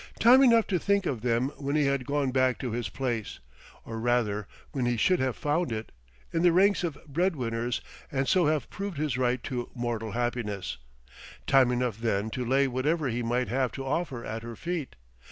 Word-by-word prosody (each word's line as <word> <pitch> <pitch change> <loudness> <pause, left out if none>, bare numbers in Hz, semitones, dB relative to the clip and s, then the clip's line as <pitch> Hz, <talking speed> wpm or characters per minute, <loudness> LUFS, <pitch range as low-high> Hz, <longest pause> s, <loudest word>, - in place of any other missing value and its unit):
time 250 +3 +7
enough 230 -4 +6
to 185 -3 0
think 200 +1 +1
of 125 -9 -2
them 120 +2 +1
when 140 0 -2
he 150 -1 +3
had 140 -2 0
gone 140 -2 0
back 130 -1 +2
to 125 - -4
his 115 -3 -2
place, 120 -2 -3 0.5
or 115 0 -5
rather 110 -4 0 0.2
when 130 -5 -1
he 120 -1 +1
should 180 +10 +3
have 130 -2 0
found 150 +1 0
it, 110 0 -4 0.4
in 165 - +1
the 175 0 +5
ranks 195 +3 +4
of 160 -5 -2
bread 170 +5 0
winners, 120 -1 -2 0.3
and 135 -1 0
so 175 +3 +4
have 150 -5 0
proved 200 -4 -5
his 150 -4 -1
right 125 -1 0
to 125 -2 -4
mortal 115 -3 -3
happiness; 110 - -2 0.7
time 135 -2 +5
enough 120 -3 -1
then 110 -2 0
to 125 - -3
lay 135 +3 +3
whatever 140 +4 0
he 120 +1 -2
might 120 +1 0
have 130 -1 0
to 135 +2 -6
offer 135 -4 -2
at 110 +1 -4
her 115 0 -7
feet. 170 - -4
130 Hz, 200 wpm, -28 LUFS, 120-150 Hz, 0.7 s, time